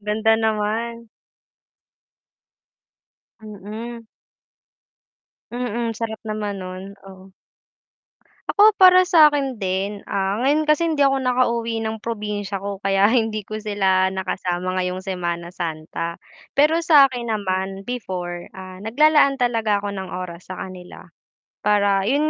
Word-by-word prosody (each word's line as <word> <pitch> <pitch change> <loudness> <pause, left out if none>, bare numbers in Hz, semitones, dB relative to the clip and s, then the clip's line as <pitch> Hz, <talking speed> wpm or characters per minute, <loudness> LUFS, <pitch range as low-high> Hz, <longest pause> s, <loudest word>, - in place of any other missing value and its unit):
Ganda 215 +2 +1
naman. 220 +1 -1 2.3
Mm. 220 +3 -8 1.5
Mm, 240 -1 -2
sarap 225 -1 -4
naman 215 -2 -4
nun, 185 +2 -8
oh. 190 0 -14 1.2
Ako, 425 +1 +6
para 370 0 +8
sa'kin 290 - +4
din? 195 +2 -2
Ah, 195 +2 -1
ngayon 290 +4 +2
kasi 305 +2 +2
hindi 300 -3 +1
ako 270 -1 +2
nakauwi 235 -3 0
ng 220 0 -4
probinsya 210 -3 -4
ko 200 -1 -5
kaya 195 0 +2
hindi 220 -4 0
ko 215 +1 -6
sila 190 -3 +2
nakasama 185 -1 -2
ngayong 180 +1 -3
Semana 175 -2 -4
Santa. 165 0 -4 0.4
Pero 310 +4 +4
sa'kin 275 -7 +4
naman 195 -2 -2
before, 180 -8 -5
ah, 185 0 -10
naglalaan 280 +5 +4
talaga 225 -5 0
ako 200 - -3
ng 190 -2 -6
oras 180 -1 -8
sa 185 - -6
kanila. 185 -1 -10 0.6
Para 200 -2 +3
'yun 290 +6 +2
210 Hz, 115 wpm, -22 LUFS, 190-240 Hz, 2.3 s, para